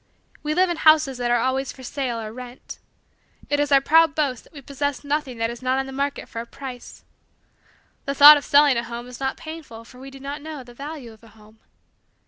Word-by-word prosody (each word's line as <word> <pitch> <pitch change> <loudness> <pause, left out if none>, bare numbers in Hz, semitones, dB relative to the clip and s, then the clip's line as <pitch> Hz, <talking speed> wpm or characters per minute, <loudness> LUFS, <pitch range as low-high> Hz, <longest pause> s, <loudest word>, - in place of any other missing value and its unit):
We 305 0 -2
live 365 0 +3
in 340 - -3
houses 310 -5 +4
that 240 -1 -1
are 240 - +3
always 260 +2 -1
for 260 - -14
sale 250 -2 -3
or 220 -1 -7
rent. 250 +1 -10 0.7
It 290 - +2
is 290 0 0
our 275 -1 +6
proud 320 +1 +4
boast 275 -6 -1
that - - -22
we 285 -2 -11
possess 285 +1 -3
nothing 285 -3 -2
that 230 0 -1
is 235 - -10
not 255 +1 0
on 270 - -1
the 270 - -8
market 280 +1 -3
for 230 - -6
a 235 - -10
price. 255 -1 -10 1.0
The 275 - -3
thought 290 +2 +11
of 290 - -2
selling 285 -3 +4
a 235 - -1
home 235 +1 -7
is 250 -1 -11
not 265 0 -2
painful 315 -8 -10
for 250 +1 -16
we 270 +1 -10
do 270 0 -13
not 280 +2 -6
know, 305 -3 -8
the 245 -1 -15
value 275 -3 -8
of 220 - -21
a - - -15
home. 215 0 -20
270 Hz, 235 wpm, -23 LUFS, 240-290 Hz, 1.0 s, thought